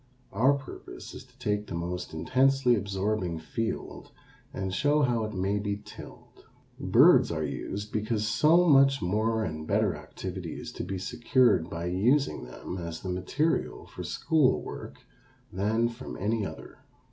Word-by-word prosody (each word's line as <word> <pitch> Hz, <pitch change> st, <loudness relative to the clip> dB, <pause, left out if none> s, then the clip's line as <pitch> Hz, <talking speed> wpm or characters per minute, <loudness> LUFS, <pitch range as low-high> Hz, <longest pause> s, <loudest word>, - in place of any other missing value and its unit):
Our 125 Hz, +8 st, +4 dB
purpose 135 Hz, -1 st, -8 dB
is -, -, -9 dB
to -, -, -26 dB
take 105 Hz, 0 st, -1 dB
the 85 Hz, -, -5 dB
most 90 Hz, +1 st, -4 dB
intensely 130 Hz, +8 st, +3 dB
absorbing 100 Hz, -3 st, -1 dB
field 110 Hz, +8 st, -4 dB, 0.4 s
and 95 Hz, -1 st, -4 dB
show 145 Hz, +7 st, +2 dB
how 120 Hz, -4 st, +1 dB
it 110 Hz, -, -6 dB
may 95 Hz, +2 st, 0 dB
be 100 Hz, 0 st, -2 dB
tilled. 105 Hz, -, -13 dB, 0.4 s
Birds -, -, +5 dB
are -, -, -2 dB
used 105 Hz, +2 st, -4 dB
because 110 Hz, 0 st, -1 dB
so 155 Hz, +10 st, +4 dB
much 135 Hz, -2 st, +6 dB
more 110 Hz, +4 st, 0 dB
and 80 Hz, -4 st, -5 dB
better -, -, +2 dB
activity 90 Hz, -3 st, -7 dB
is -, -, -7 dB
to -, -, -5 dB
be 95 Hz, -, -4 dB
secured 115 Hz, -, +2 dB
by 85 Hz, 0 st, -4 dB
using 115 Hz, -, +1 dB
them 90 Hz, +8 st, -7 dB
as 85 Hz, -1 st, -6 dB
the 95 Hz, -, -5 dB
material 95 Hz, -, -1 dB
for -, -, -9 dB
school 155 Hz, -6 st, +2 dB
work -, -, -8 dB, 0.6 s
than 110 Hz, +5 st, +1 dB
from 120 Hz, +2 st, -8 dB
any 105 Hz, +1 st, 0 dB
other. -, -, -11 dB
105 Hz, 155 wpm, -28 LUFS, 95-125 Hz, 0.6 s, much